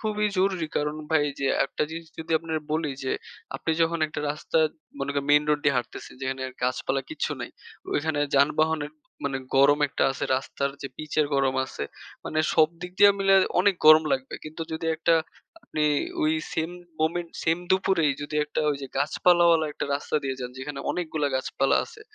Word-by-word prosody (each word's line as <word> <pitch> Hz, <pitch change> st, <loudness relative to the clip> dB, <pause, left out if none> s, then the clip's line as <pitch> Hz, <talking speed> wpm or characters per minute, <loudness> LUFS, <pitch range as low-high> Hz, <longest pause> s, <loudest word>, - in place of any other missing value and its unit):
খুবই 210 Hz, -1 st, 0 dB
জরুরি 185 Hz, -4 st, +1 dB
কারণ 150 Hz, +1 st, -1 dB
ভাই 160 Hz, -2 st, +3 dB, 0.2 s
যে 135 Hz, -, 0 dB, 0.2 s
একটা 135 Hz, -, -3 dB
জিনিস 165 Hz, 0 st, -7 dB
যদি 160 Hz, 0 st, -7 dB
আপনের 160 Hz, -1 st, -3 dB
বলি 155 Hz, -1 st, 0 dB
যে, 130 Hz, -, 0 dB, 0.4 s
আপনি 160 Hz, -, -3 dB
যখন 165 Hz, +1 st, +1 dB
একটা 155 Hz, -, -5 dB
রাস্তা 150 Hz, +2 st, -1 dB, 0.4 s
মনে 145 Hz, -, -2 dB
করেন, 140 Hz, 0 st, -1 dB
মেইন 150 Hz, 0 st, +6 dB
রোড 150 Hz, -1 st, +2 dB
দিয়ে 140 Hz, -2 st, +3 dB
হাঁটতেছেন 120 Hz, -1 st, -5 dB
যেখানে 130 Hz, 0 st, -2 dB, 0.2 s
গাছপালা 130 Hz, +2 st, 0 dB
কিচ্ছু -, -, -2 dB
নাই। -, -, -5 dB, 0.4 s
ওইখানে 150 Hz, 0 st, 0 dB, 0.2 s
যানবাহনের 150 Hz, +2 st, +2 dB, 0.3 s
মানে 135 Hz, -1 st, -1 dB, 0.2 s
গরম 145 Hz, +2 st, +6 dB
একটা -, -, -2 dB
আছে, -, -, -3 dB
রাস্তার 140 Hz, +1 st, -2 dB
যে 135 Hz, -, -4 dB
পিচের 155 Hz, 0 st, 0 dB
গরম 135 Hz, -1 st, +2 dB
আছে 100 Hz, -, -6 dB, 0.4 s
মানে 155 Hz, -, -2 dB, 0.2 s
সব 155 Hz, -1 st, +5 dB
দিক 180 Hz, 0 st, -6 dB
দিয়ে 205 Hz, 0 st, +9 dB
মিলায় 195 Hz, 0 st, +5 dB, 0.2 s
অনেক 200 Hz, 0 st, +3 dB
গরম 155 Hz, 0 st, +9 dB
লাগবে। 130 Hz, 0 st, -2 dB
কিন্তু 155 Hz, +1 st, -6 dB
যদি 160 Hz, +1 st, -3 dB
একটা 165 Hz, +1 st, +3 dB, 0.5 s
আপনি 155 Hz, -, -1 dB, 0.4 s
ওই 155 Hz, +1 st, +3 dB, 0.2 s
same 165 Hz, +2 st, -2 dB, 0.3 s
moment 170 Hz, +2 st, 0 dB, 0.2 s
সেম 165 Hz, +1 st, +2 dB
দুপুরেই 190 Hz, -5 st, +3 dB
যদি 145 Hz, +1 st, -6 dB
একটা 150 Hz, -, -3 dB
ওই 145 Hz, -, -1 dB
যে -, -, -4 dB
গাছপালাওয়ালা 165 Hz, +2 st, +4 dB
একটা -, -, -4 dB
রাস্তা 145 Hz, +2 st, -2 dB
দিয়ে 135 Hz, -1 st, -2 dB
যান, 125 Hz, -1 st, -4 dB
যেখানে 140 Hz, +1 st, -5 dB
অনেকগুলা 155 Hz, -4 st, -1 dB
গাছপালা 135 Hz, +1 st, +1 dB
আছে। 450 Hz, -2 st, -15 dB
155 Hz, 180 wpm, -26 LUFS, 140-165 Hz, 0.5 s, দিয়ে